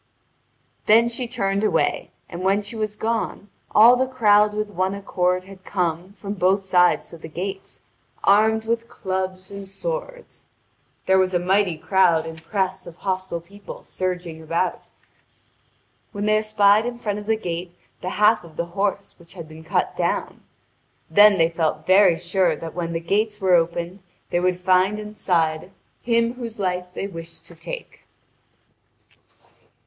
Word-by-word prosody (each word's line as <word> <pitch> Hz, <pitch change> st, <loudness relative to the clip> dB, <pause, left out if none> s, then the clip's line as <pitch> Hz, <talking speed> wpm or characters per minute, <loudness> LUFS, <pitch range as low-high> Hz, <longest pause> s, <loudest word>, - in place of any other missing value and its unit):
Then 230 Hz, +2 st, +6 dB
she 240 Hz, +1 st, -3 dB
turned 200 Hz, -4 st, -1 dB
away, 215 Hz, -, +1 dB, 0.2 s
and 170 Hz, 0 st, -7 dB
when 195 Hz, +2 st, +2 dB
she 210 Hz, +3 st, -7 dB
was 215 Hz, -1 st, -3 dB
gone 220 Hz, -2 st, -3 dB, 0.2 s
all 230 Hz, +4 st, +7 dB
the 260 Hz, +1 st, +1 dB
crowd 210 Hz, -5 st, +4 dB
with 215 Hz, 0 st, -3 dB
one 190 Hz, +1 st, -1 dB
accord 180 Hz, -2 st, 0 dB
had 190 Hz, 0 st, -14 dB
come 180 Hz, 0 st, -2 dB
from 200 Hz, -1 st, -6 dB
both 190 Hz, 0 st, +2 dB
sides 180 Hz, -2 st, +2 dB
to 170 Hz, -, -11 dB
the 160 Hz, -, -9 dB
gates, 190 Hz, +4 st, -6 dB, 0.4 s
armed 220 Hz, +2 st, +4 dB
with 230 Hz, 0 st, -1 dB
clubs 185 Hz, 0 st, -4 dB
and 200 Hz, -1 st, -8 dB
swords. -, -, -6 dB, 0.6 s
There 190 Hz, 0 st, +4 dB
was 185 Hz, -1 st, +1 dB
a -, -, +3 dB
mighty 185 Hz, -1 st, +1 dB
crowd 170 Hz, -2 st, +3 dB
and 160 Hz, 0 st, -8 dB
press 190 Hz, 0 st, -2 dB
of 170 Hz, -, -10 dB
hostile 185 Hz, -3 st, -3 dB
people 200 Hz, +4 st, -12 dB
surging 180 Hz, -3 st, -4 dB
about, 165 Hz, +3 st, -2 dB, 1.2 s
when 205 Hz, 0 st, -3 dB
they 215 Hz, 0 st, +3 dB
espied 215 Hz, 0 st, +3 dB
in 240 Hz, -1 st, -5 dB
front 210 Hz, -3 st, -3 dB
of 205 Hz, -, -10 dB
the 220 Hz, -, +3 dB
gate 175 Hz, -3 st, -5 dB, 0.2 s
the 180 Hz, -, -3 dB
half 210 Hz, +2 st, +3 dB
of 165 Hz, -2 st, -14 dB
the 170 Hz, -, -2 dB
horse 200 Hz, 0 st, -1 dB
which 170 Hz, +2 st, -15 dB
had 165 Hz, -3 st, -8 dB
been 160 Hz, +1 st, -12 dB
cut 160 Hz, -, -1 dB
down. -, -, -2 dB, 0.7 s
Then 205 Hz, +3 st, +7 dB
they 165 Hz, -2 st, +4 dB
felt 160 Hz, -2 st, -2 dB
very 185 Hz, -2 st, +5 dB
sure 175 Hz, 0 st, +1 dB
that 165 Hz, +1 st, -8 dB
when 170 Hz, -1 st, -3 dB
the 165 Hz, -, -1 dB
gates 210 Hz, +5 st, -1 dB
were 190 Hz, -2 st, +2 dB
opened 170 Hz, +2 st, 0 dB, 0.3 s
they 175 Hz, -, +2 dB
would 180 Hz, 0 st, 0 dB
find 185 Hz, +2 st, +3 dB
inside 180 Hz, -6 st, -1 dB, 0.3 s
him 230 Hz, 0 st, +1 dB
whose 235 Hz, -3 st, -7 dB
life 180 Hz, -2 st, -1 dB
they -, -, -3 dB
wished 165 Hz, -3 st, -8 dB
to -, -, -14 dB
take. -, -, -9 dB
190 Hz, 160 wpm, -22 LUFS, 175-210 Hz, 1.2 s, all